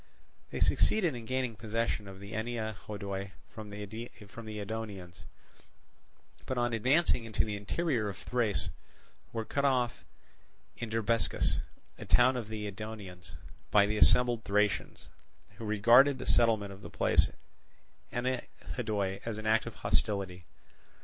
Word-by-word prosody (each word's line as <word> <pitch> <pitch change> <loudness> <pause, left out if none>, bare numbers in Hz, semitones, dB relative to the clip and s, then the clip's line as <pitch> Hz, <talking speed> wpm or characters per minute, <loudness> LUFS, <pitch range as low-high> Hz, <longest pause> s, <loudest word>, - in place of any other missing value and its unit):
They - - -4
succeeded 180 -8 +3
in 120 -2 -7
gaining 130 -3 -1
possession 110 -1 -2
of 95 -1 -9
Ennea 110 +1 -3
Hodoi 100 -2 -4 0.2
from 110 -1 -8
the 100 0 -7
Edonians, 110 -3 -7 1.2
but 130 - -2
on 120 0 +1
advancing 130 +3 +3
into 110 -2 0
the 105 -1 -3
interior 110 +2 -1
of 95 - -7
Thrace 120 -5 -1 0.6
were 115 -1 -3
cut 140 - -1
off 125 -4 +1 0.7
in 115 - -5
Drabescus, 115 +1 +1 0.4
a - - -7
town 125 +1 +5
of 120 -4 -3
the 110 -1 -4
Edonians, 100 -5 -7 0.3
by 100 -1 +6
the 105 +1 -1
assembled 120 0 +5
Thracians, 105 0 0 0.5
who 115 - -6
regarded 120 +6 +6
the - - -6
settlement 110 -4 +3
of 95 - -13
the - - -8
place - - +3 0.8
Ennea 125 +2 -1 0.3
Hodoi 100 -5 -1
as 115 -2 -3
an 110 - -6
act 110 +1 +3
of - - -6
hostility. 95 -4 -1
110 Hz, 135 wpm, -31 LUFS, 100-120 Hz, 1.2 s, by